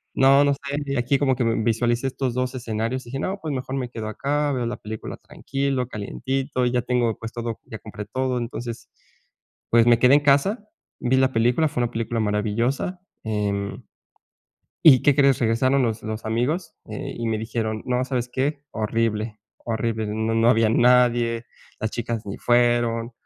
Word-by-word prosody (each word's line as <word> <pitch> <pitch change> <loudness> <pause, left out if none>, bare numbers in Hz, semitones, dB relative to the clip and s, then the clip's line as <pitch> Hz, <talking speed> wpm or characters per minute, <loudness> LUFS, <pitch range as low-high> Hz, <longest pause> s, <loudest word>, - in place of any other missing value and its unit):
no 135 +1 +6
no 140 - +3
sé 140 0 -3
aquí 125 +3 +2
como 135 -2 +2
que 125 - -1
visualicé 115 +2 +1
estos 130 -1 -2
dos 125 0 -1
escenarios" 115 +1 -3
y - - -11
dije: 135 +2 -4
"No". 190 +7 -2
Pues 155 -2 -3
mejor 130 0 -4
me 125 -2 -3
quedo 115 -3 -6
acá. 145 +5 -1
Veo 125 -2 -1
la 120 - -4
película 110 0 -7
tranquilo, 135 -2 -3
calientito. 130 +4 -2
Ya 125 0 +1
tengo, 120 -3 0
pues, 115 0 -6
todo. 115 -1 -4
ya 110 - -8
compré 105 -1 -8
todo 130 +3 -1
entonces. 120 -1 -6 0.8
Pues 115 0 +5
me 120 -1 +6
quedé 125 +2 +6
en - - +6
casa. 145 - +2 0.3
Vi 125 +1 +1
la 130 0 +3
película. 120 +7 +3
Fue 125 - -2
una 120 - -2
película 115 0 -2
maravillosa, 115 - -1 0.2
eh, 100 -2 -1 1.1
y, 135 -6 +9
¿qué 145 - +5
crees? 140 -2 +4
Regresaron 130 +4 +2
los 115 -2 -2
los 110 0 -5
amigos 135 +10 -1
y, 110 - -8 0.3
eh, - - 0
me 110 - 0
dijeron: 110 -1 -3
"No, 125 0 0
¿sabes 125 -2 -2
qué? 140 +3 -2
Horrible, 110 0 -1 0.2
horrible. 110 -1 -2
No 110 +2 -1
no 115 +1 +4
había 115 -2 +4
nadie. 120 -1 +3 0.3
Las 110 - -2
chicas 115 -2 -3
ni 100 - -5
fueron. 120 -1 +2
120 Hz, 175 wpm, -23 LUFS, 115-130 Hz, 1.1 s, y